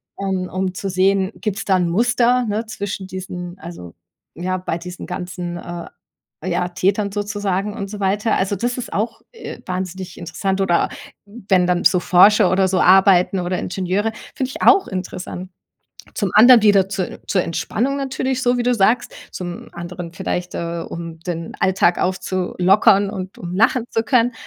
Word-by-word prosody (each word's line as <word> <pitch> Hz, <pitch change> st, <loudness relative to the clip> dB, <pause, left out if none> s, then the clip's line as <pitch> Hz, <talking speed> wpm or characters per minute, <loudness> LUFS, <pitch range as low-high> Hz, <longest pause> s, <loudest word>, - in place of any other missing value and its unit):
um 190 Hz, -2 st, -2 dB
um, 185 Hz, 0 st, -2 dB
zu 195 Hz, +1 st, -4 dB
sehen, 190 Hz, +1 st, +2 dB
gibt 210 Hz, -3 st, -3 dB
's -, -, -3 dB
da 190 Hz, -2 st, +3 dB
'n 180 Hz, -1 st, +1 dB
Muster, 245 Hz, +6 st, +2 dB
ne, 215 Hz, +3 st, -1 dB
zwischen 200 Hz, -3 st, -5 dB
diesen 180 Hz, -1 st, -7 dB
also, 165 Hz, -, -10 dB, 0.4 s
ja, 185 Hz, +1 st, -2 dB
bei 180 Hz, -2 st, -3 dB
diesen 180 Hz, +1 st, -8 dB
ganzen 180 Hz, -1 st, -5 dB
äh, 175 Hz, 0 st, -7 dB, 0.6 s
ja, 175 Hz, -, -1 dB
Tätern 195 Hz, +2 st, 0 dB
sozusagen 205 Hz, -1 st, -2 dB
und 200 Hz, -, -4 dB
so 210 Hz, 0 st, -7 dB
weiter. 205 Hz, +3 st, +1 dB
Also, 195 Hz, +1 st, 0 dB
das 240 Hz, +5 st, -2 dB
ist 245 Hz, -, -6 dB
auch, 215 Hz, +3 st, -2 dB
äh, 465 Hz, -, -9 dB
wahnsinnig 185 Hz, 0 st, -5 dB
interessant 190 Hz, +3 st, -2 dB
oder 175 Hz, -3 st, +2 dB, 0.4 s
wenn 200 Hz, -4 st, 0 dB
dann 180 Hz, -1 st, +1 dB
so 180 Hz, -, +5 dB
Forscher 195 Hz, +3 st, +5 dB
oder 190 Hz, 0 st, +3 dB
so 185 Hz, 0 st, +1 dB
arbeiten 190 Hz, 0 st, +5 dB
oder 180 Hz, +1 st, -2 dB
Ingenieure, 190 Hz, +4 st, -1 dB, 0.2 s
find 260 Hz, -1 st, -2 dB
ich -, -, -8 dB
auch 390 Hz, -, +6 dB
interessant. 185 Hz, -1 st, -6 dB, 0.6 s
Zum 200 Hz, -4 st, -1 dB
anderen 235 Hz, +1 st, +8 dB
wieder 200 Hz, -3 st, +4 dB
zu 195 Hz, -2 st, -4 dB
zur 185 Hz, -, +1 dB
Entspannung 235 Hz, -, -2 dB
natürlich 265 Hz, -1 st, -2 dB
so, 245 Hz, -1 st, +2 dB
wie -, -, +1 dB
du 245 Hz, 0 st, +2 dB
sagst. 220 Hz, +3 st, +2 dB, 0.2 s
Zum 175 Hz, -1 st, -7 dB
anderen 175 Hz, 0 st, -7 dB
vielleicht, 180 Hz, -1 st, -3 dB
äh, 170 Hz, 0 st, -3 dB
um 165 Hz, -1 st, -7 dB
den 170 Hz, -1 st, -5 dB
Alltag 185 Hz, -2 st, +3 dB
aufzulockern 190 Hz, +2 st, +2 dB
und 190 Hz, -2 st, -6 dB
um 175 Hz, 0 st, -6 dB
lachen 225 Hz, +4 st, +3 dB
zu 225 Hz, -, 0 dB
können. 245 Hz, 0 st, +2 dB
190 Hz, 170 wpm, -20 LUFS, 180-210 Hz, 0.6 s, anderen